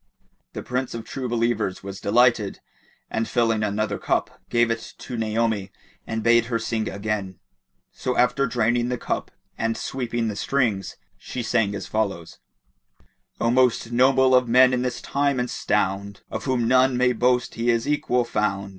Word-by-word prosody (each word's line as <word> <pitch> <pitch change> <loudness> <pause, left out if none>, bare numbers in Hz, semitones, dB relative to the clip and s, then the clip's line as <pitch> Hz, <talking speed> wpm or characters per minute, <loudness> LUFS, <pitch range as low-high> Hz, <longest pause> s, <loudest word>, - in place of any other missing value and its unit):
The - - -6
Prince 125 0 -3
of 115 -1 -6
True 130 0 -5
Believers 115 -5 -1
was 95 0 -7
delighted 115 -1 +2 0.5
and 110 0 -1
filling 115 -1 +1
another 105 0 -1
cup, - - -1
gave 120 -1 +2
it 115 - -5
to 125 - -7
Naomi 110 -3 -1 0.4
and 115 -1 -3
bade 115 0 +4
her 115 0 -1
sing 115 -1 -2
again; 100 -2 -3 0.5
so 125 - -3
after 125 +3 +3
draining 120 0 +1
the 125 - -1
cup - - -3 0.3
and 115 0 0
sweeping 120 -2 -2
the 105 - -3
strings, 110 -4 -1 0.2
she 125 - -5
sang 105 -3 +1
as - - -5
follows:— 95 -7 -3 1.0
"O 115 - +2
most 125 -2 +2
noble 130 +2 +4
of 125 -1 +4
men 125 +2 +6
in 125 - +1
this 125 -1 -3
time 140 -2 0
and 125 0 -2
stound, 100 -1 -1
* - - -39
Of - - -4
whom 125 -4 +1
none 130 +1 +4
may 125 0 +3
boast 125 +1 +1
he 115 +1 -1
is 115 -1 +1
equal 125 -4 +1
found! 100 -3 -1
115 Hz, 170 wpm, -24 LUFS, 110-125 Hz, 1.0 s, men